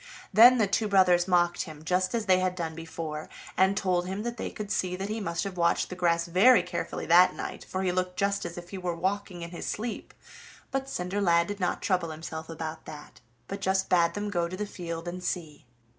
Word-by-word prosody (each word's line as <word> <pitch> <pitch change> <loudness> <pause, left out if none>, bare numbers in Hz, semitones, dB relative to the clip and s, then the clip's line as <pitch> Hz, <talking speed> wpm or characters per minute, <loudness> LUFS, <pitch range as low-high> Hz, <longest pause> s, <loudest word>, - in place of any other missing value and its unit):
Then 240 +5 +8
the 220 - +3
two 205 +2 0
brothers 185 -3 +4
mocked 175 -1 +2
him 155 -2 -11
just 185 +4 0
as 225 -2 -1
they 185 -2 +4
had 185 0 0
done 165 -3 -3
before, 160 -1 -6 0.3
and 190 +2 +3
told 180 -2 0
him 195 +3 -3
that 235 0 -3
they - - -3
could 210 -2 -7
see 180 -2 0
that 195 +2 -4
he 220 +1 -2
must 170 -3 -2
have 195 -2 -6
watched 170 0 +2
the - - -4
grass 170 -2 +1
very 185 +4 +5
carefully 180 -1 -4
that 175 +2 +6
night, - - -6
for 190 +1 -2
he 185 - +1
looked 180 0 -2
just 200 0 0
as 170 - -6
if 175 0 -9
he 195 - -5
were 175 -2 -2
walking 190 0 -2
in 170 - -7
his 170 - -6
sleep; 225 +2 -4 0.6
but 270 0 -2
Cinderlad 180 -3 +1
did 205 +2 -6
not 180 - -1
trouble 180 -5 +1
himself 160 0 -7
about 160 -1 -6
that, 150 -4 -11 0.3
but 195 0 -6
just 190 0 +1
bade 170 -2 +3
them 205 0 -3
go 170 -3 0
to 185 +2 -6
the 210 - -2
field 170 -4 -6
and 180 +1 -5
see. 160 -7 -4
180 Hz, 225 wpm, -28 LUFS, 170-195 Hz, 0.6 s, Then